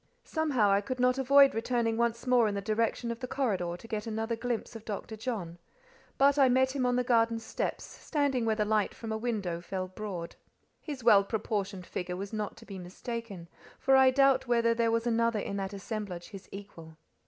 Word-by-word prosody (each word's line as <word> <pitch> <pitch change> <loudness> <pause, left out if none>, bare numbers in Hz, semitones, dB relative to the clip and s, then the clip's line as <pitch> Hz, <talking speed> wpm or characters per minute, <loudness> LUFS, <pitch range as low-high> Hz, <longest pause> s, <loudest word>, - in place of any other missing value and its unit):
Somehow 280 -11 +1
I 200 +1 +3
could 255 +5 -5
not 250 +1 +3
avoid 275 +1 +6
returning 230 0 0
once 235 +1 0
more 250 -3 +4
in 205 - -2
the - - -1
direction 230 +3 -1
of 230 - -6
the 255 - -5
corridor 195 -11 -1
to 230 - -13
get 215 0 -4
another 225 +1 -2
glimpse 235 0 -3
of 225 - -8
Dr. 220 +1 -5
John; 210 -8 -5 0.6
but 280 +1 +4
I 265 -2 +6
met 260 +2 +2
him 255 -2 +1
on 245 - +2
the 250 - +2
garden 230 -2 +2
steps, 225 - -3
standing 285 -5 -1
where 220 -1 +1
the 210 -1 0
light 215 -1 +1
from 225 -1 -6
a - - -1
window 205 -8 -2
fell 185 +1 -4
broad. 185 -3 -6 0.5
His 285 -6 -7
well 205 -4 +7
proportioned 200 -3 -3
figure 180 0 -4
was 200 +3 -6
not 215 -1 -3
to 230 - -13
be 195 -3 -8
mistaken, 195 0 -7 0.3
for 270 - +3
I 265 0 +7
doubt 275 0 +3
whether 235 -1 +3
there 230 0 +1
was 230 +1 0
another 230 -1 +2
in 200 -1 -3
that 195 0 -3
assemblage 195 -4 -6
his 195 -1 -11
equal. 165 -6 -10
225 Hz, 205 wpm, -30 LUFS, 200-245 Hz, 0.6 s, well